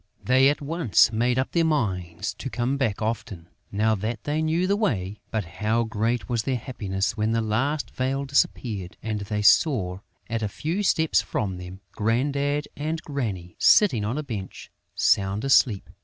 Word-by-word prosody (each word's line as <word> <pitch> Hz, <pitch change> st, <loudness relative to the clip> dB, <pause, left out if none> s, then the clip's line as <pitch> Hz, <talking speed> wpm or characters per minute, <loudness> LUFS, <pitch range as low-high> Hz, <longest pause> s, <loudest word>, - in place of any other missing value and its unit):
They 130 Hz, +2 st, +5 dB
at 145 Hz, +1 st, -1 dB
once 145 Hz, -, +3 dB
made 120 Hz, +3 st, +1 dB
up 130 Hz, -, 0 dB
their 170 Hz, -, +2 dB
minds 95 Hz, -, -1 dB
to 135 Hz, -, -4 dB
come 125 Hz, +2 st, -1 dB
back 115 Hz, -7 st, -1 dB
often, 105 Hz, -6 st, -4 dB, 0.2 s
now 110 Hz, +2 st, +2 dB
that 110 Hz, +2 st, -3 dB
they 150 Hz, +2 st, -1 dB
knew 160 Hz, +3 st, +1 dB
the 200 Hz, +2 st, +2 dB
way. 105 Hz, -, -1 dB
But 110 Hz, -4 st, -2 dB
how 110 Hz, +7 st, 0 dB
great 115 Hz, +2 st, -1 dB
was 120 Hz, -2 st, 0 dB
their 130 Hz, +2 st, -1 dB
happiness 100 Hz, -6 st, -3 dB
when 110 Hz, 0 st, 0 dB
the 115 Hz, -, +2 dB
last 135 Hz, +8 st, -1 dB
veil 135 Hz, +2 st, -1 dB
disappeared 110 Hz, -8 st, -1 dB
and 110 Hz, -1 st, -2 dB
they 105 Hz, +1 st, -3 dB
saw, 105 Hz, -, +3 dB, 0.3 s
at 115 Hz, -1 st, -2 dB
a 105 Hz, -, 0 dB
few 165 Hz, -, -2 dB
steps 160 Hz, -5 st, +2 dB
from 95 Hz, -4 st, -3 dB
them, 90 Hz, +1 st, -9 dB
Grandad 140 Hz, +6 st, 0 dB
and 155 Hz, +2 st, -3 dB
Granny 105 Hz, -, -4 dB
sitting 130 Hz, -, +5 dB
on 115 Hz, +7 st, -2 dB
a 155 Hz, -, -2 dB
bench, 105 Hz, -9 st, -7 dB, 0.2 s
sound 100 Hz, +4 st, +2 dB
asleep. 120 Hz, -6 st, +3 dB
115 Hz, 170 wpm, -25 LUFS, 105-140 Hz, 0.3 s, They